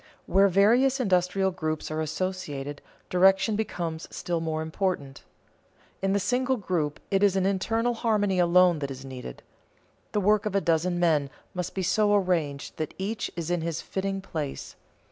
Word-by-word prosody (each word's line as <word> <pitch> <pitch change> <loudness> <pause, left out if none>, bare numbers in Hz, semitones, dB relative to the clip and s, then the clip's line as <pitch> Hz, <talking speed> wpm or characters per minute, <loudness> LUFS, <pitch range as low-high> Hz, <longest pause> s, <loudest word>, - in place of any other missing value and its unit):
Where 195 +2 +4
various 235 +8 +4
industrial 190 -3 +2
groups 155 -4 -3
are 155 0 -1
associated, 155 -4 -4 0.3
direction 195 +4 +4
becomes 175 -6 -3
still 175 -2 -3
more 160 -1 -2
important. 160 -5 -3 0.8
In 195 0 +1
the 200 - +2
single 250 +6 +1
group 170 -8 -2
it 195 0 +2
is 200 -2 +4
an 190 -1 +1
internal 225 +5 +1
harmony 210 -5 +1
alone 175 -1 +5
that 140 -1 -3
is 135 0 -8
needed. 125 - -8 0.7
The 210 - +2
work 210 +1 +3
of 200 - -3
a - - +5
dozen 175 0 +1
men 155 -5 +2 0.2
must 180 -1 -4
be 190 - -1
so 205 +3 +3
arranged 165 -8 -1
that 155 -2 -4
each 205 +3 -3
is 170 0 -3
in 175 -1 0
his 165 0 -3
fitting 195 0 -3
place. 155 -7 -5
185 Hz, 165 wpm, -27 LUFS, 160-200 Hz, 0.8 s, alone